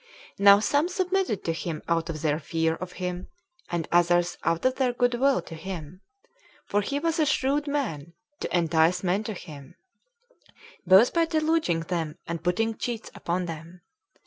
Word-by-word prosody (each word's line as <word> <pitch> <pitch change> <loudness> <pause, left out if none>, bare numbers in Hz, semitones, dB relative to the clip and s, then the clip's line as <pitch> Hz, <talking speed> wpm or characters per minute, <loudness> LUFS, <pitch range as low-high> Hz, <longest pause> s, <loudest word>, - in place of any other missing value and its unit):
Now 200 0 +8
some 285 +10 +1
submitted 370 - -1
to 165 - -1
him 160 -1 -5
out 170 0 0
of 155 -1 -5
their 150 -1 +1
fear 160 +1 0
of 180 +2 -7
him, 180 0 -4 0.4
and 170 -2 -2
others 175 0 +3
out 165 +4 0
of 255 0 +2
their 255 -2 +1
good 245 0 +1
will 265 +2 +2
to - - -10
him; 170 0 -7 0.6
for 205 - +1
he 280 +7 -2
was 330 +2 -1
a 310 - +4
shrewd 280 +3 +1
man 185 - -3 0.3
to - - -1
entice 165 +2 +2
men 190 +3 +1
to 215 - -3
him, 145 -6 -11 1.1
both 190 +6 +6
by 335 -1 +3
deluding 310 - +1
them 165 -2 -3
and 170 -1 -4
putting 225 +6 0
cheats 235 -2 -4
upon 180 +1 -2
them. 165 +2 -8
180 Hz, 170 wpm, -26 LUFS, 165-250 Hz, 1.1 s, Now